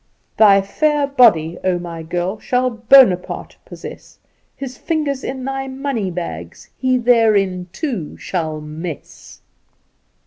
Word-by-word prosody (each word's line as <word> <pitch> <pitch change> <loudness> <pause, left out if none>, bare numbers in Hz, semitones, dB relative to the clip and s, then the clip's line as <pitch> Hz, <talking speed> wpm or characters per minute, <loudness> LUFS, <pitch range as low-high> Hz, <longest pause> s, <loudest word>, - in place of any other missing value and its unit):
"Thy 200 -3 +6
fair 295 +8 +1
body, 210 - +3
oh, 185 -1 +1
my 170 -2 -7
girl, 175 +5 -3
Shall 250 +2 0
Bonaparte 230 -5 +3
possess; - - -11 0.4
His 260 -2 -7
fingers 285 -2 -2
in 260 -1 -5
thy 270 0 -3
money 265 -6 -3
bags, 85 - -7
He 255 -1 +1
therein, 215 -7 +2
too, 215 - -4
shall 160 -4 -3
mess." 155 +1 -9
215 Hz, 115 wpm, -19 LUFS, 175-260 Hz, 0.4 s, Thy